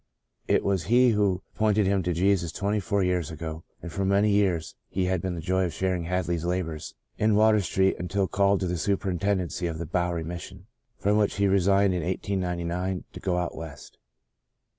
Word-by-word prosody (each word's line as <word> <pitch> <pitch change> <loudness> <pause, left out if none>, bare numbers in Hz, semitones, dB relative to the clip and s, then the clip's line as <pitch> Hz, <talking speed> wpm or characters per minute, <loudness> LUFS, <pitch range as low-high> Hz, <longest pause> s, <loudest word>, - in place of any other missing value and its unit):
It - - +3
was 95 -4 0
he 125 +4 +5
who 100 -4 +1
pointed 105 -1 +2
him 95 0 +2
to 90 0 -1
Jesus 90 -1 +1
twenty 100 +4 -1
four 100 +1 0
years 90 -4 0
ago 80 0 -6 0.2
and 85 - -6
for 100 - -2
many 100 +2 +3
years 95 -5 +1 0.2
he 95 -1 -1
had 90 -1 0
the 90 -2 -3
joy 95 +3 +1
of 85 - -3
sharing 90 -3 -1
Hadley's 85 -2 -1
labours 85 -3 -3 0.2
in 110 0 +3
Water 110 0 +5
Street 95 +1 +1
until 95 +2 -1
called 100 0 +2
to 95 - 0
the 90 -1 -2
superintendency 95 -1 -1
of 80 -2 -4
the 85 - -4
Bowery 85 0 -1
Mission 90 +2 -8 0.3
from 105 +1 +2
which 105 -1 +2
he 100 - +1
resigned 100 0 +3
in 90 - -1
1899 90 0 -2
to - - -8
go 90 -2 -1
out 90 -1 -2
West. 80 -3 -10
95 Hz, 185 wpm, -26 LUFS, 85-100 Hz, 0.3 s, he